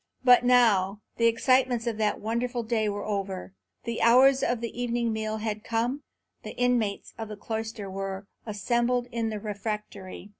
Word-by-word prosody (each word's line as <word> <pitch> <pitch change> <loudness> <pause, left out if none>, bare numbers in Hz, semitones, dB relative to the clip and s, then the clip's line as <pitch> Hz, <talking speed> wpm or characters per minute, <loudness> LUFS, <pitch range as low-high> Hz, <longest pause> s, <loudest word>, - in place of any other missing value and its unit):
But 250 -1 +7
now 215 -6 +4 0.2
the 230 - +4
excitements 250 +1 +2
of 230 -2 -2
that 210 -1 +1
wonderful 235 +2 -2
day 220 -2 0
were 205 0 -4
over; 195 -2 -4 0.3
the 235 -1 -3
hours 260 +3 +6
of 245 -1 0
the 235 +1 -5
evening 235 -1 0
meal 220 0 -2
had 215 -1 -3
come; 235 +5 -1 0.4
the - - -9
inmates 245 -5 0
of 225 - -4
the 210 -1 -8
cloister 220 0 -5
were 195 0 -5 0.2
assembled 240 +4 0
in 230 -1 -1
the 215 -1 -4
refectory. 205 -2 -6
225 Hz, 160 wpm, -27 LUFS, 210-240 Hz, 0.4 s, But